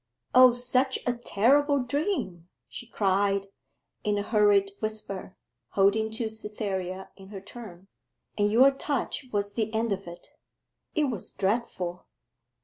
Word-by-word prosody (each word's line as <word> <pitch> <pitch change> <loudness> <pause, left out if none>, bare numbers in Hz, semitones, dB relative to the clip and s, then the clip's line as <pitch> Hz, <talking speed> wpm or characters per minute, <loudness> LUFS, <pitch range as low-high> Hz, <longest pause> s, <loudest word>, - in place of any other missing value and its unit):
'O 255 -1 +8
such 250 +2 +1
a 245 - +1
terrible 270 +5 +2
dream!' 250 - -2 0.2
she 240 - -9
cried, 200 -2 +1 0.6
in 210 -1 +1
a 205 - -1
hurried 205 -2 +3
whisper, 210 -3 -4 0.4
holding 205 +3 +3
to 220 +1 -3
Cytherea 195 -4 -5
in 195 -1 -13
her 200 -1 -8
turn; 195 -3 -11 0.5
'and 205 0 +1
your 260 +5 +6
touch 275 -1 -3
was 205 -1 -1
the 220 0 -1
end 225 0 0
of 195 -2 -3
it. 175 0 -11 0.7
It 310 - +2
was 210 -6 -5
dreadful. 190 -4 -2
210 Hz, 135 wpm, -27 LUFS, 195-245 Hz, 0.7 s, O